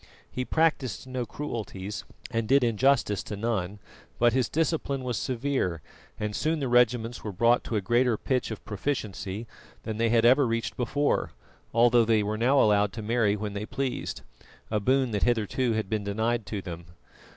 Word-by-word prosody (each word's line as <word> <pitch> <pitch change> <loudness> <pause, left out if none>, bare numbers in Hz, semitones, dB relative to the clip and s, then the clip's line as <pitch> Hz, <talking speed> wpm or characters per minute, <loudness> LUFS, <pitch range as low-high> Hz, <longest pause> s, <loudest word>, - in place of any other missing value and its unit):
He 125 - -3
practised 140 - 0
no 130 -2 -4
cruelties, 105 -8 -5 0.3
and 115 -2 -1
did 135 +2 +4
injustice 115 -3 +2
to 105 - -6
none; 105 -3 -2 0.4
but 120 0 +4
his 130 -3 +1
discipline 150 -4 -1
was 125 -2 -2
severe, 125 - -1 0.4
and 105 -1 -2
soon 160 +1 0
the 135 - -1
regiments 120 -1 +2
were 105 - -4
brought 115 +6 +3
to 115 - -3
a 105 - +1
greater 120 +3 +2
pitch 130 +2 -1
of 110 - -7
proficiency 105 -3 -3 0.4
than 110 -1 -4
they 115 0 +2
had 115 0 +3
ever 130 +2 +5
reached 115 0 -2
before, 145 +4 0 0.4
although 120 +1 +5
they 110 -1 +3
were 105 +1 -2
now 125 +5 +3
allowed 105 -3 +3
to 110 - -6
marry 110 -2 +2
when 105 -1 -4
they 105 +1 -4
pleased, 135 -2 -3 0.5
a 105 - +1
boon 130 +3 +2
that 105 -2 -1
hitherto 120 +1 +1
had 110 -2 -1
been 110 0 -2
denied 110 +2 -1
to 100 -3 -4
them. 85 -2 -8
115 Hz, 175 wpm, -27 LUFS, 105-125 Hz, 0.5 s, ever